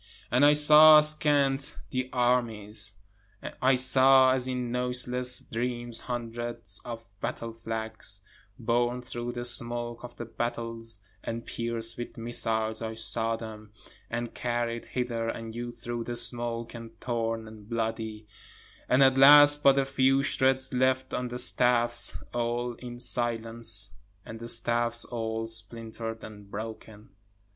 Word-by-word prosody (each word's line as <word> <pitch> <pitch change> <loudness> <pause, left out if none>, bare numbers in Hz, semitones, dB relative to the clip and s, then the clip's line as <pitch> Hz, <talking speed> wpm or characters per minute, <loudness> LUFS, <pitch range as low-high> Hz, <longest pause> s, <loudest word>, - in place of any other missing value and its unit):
And 125 +4 +3
I 145 0 +7
saw 150 +1 +8
askant 145 -3 +2
the 130 -1 -3
armies, 110 -4 +1 0.7
I 130 +1 +4
saw 130 +1 +5
as 130 -1 -1
in 125 -2 -3
noiseless 125 0 -1
dreams 120 0 -4
hundreds 120 -1 -5
of 115 -1 -8
battle 115 +3 -5
flags, 110 -1 -1 0.4
Borne 120 +1 -1
through 120 -1 -5
the 120 0 -5
smoke 120 0 0
of 120 0 -10
the 120 - -7
battles 115 -2 -4 0.2
and 115 0 -5
pierced 115 -1 -2
with 120 - -7
missiles 110 -1 -1
I 110 0 -5
saw 110 +1 0
them, 110 -2 -10 0.4
And 120 0 -4
carried 120 -1 -3
hither 120 -2 -3
and 115 -1 -6
yon 120 +1 -6
through 120 -1 -6
the 120 - -5
smoke 120 -1 -1
and 115 -1 -11
torn 115 -2 -3
and 110 -1 -14
bloody, 110 -2 -4 0.6
And 130 +2 +5
at 135 0 +4
last 145 +1 +8
but 140 -1 +5
a 135 - +2
few 135 0 +2
shreds 130 -1 +1
left 130 +1 0
on 125 - -2
the 120 0 -6
staffs, 120 -1 +3 0.2
(all 120 0 -2
in 120 -1 -9
silence,) 115 -4 0 0.3
And 110 - -9
the 115 - -8
staffs 120 0 +2
all 115 -1 -4
splinter'd 115 0 -5
and 105 -2 -12
broken. 110 0 -9
120 Hz, 135 wpm, -27 LUFS, 115-125 Hz, 0.7 s, saw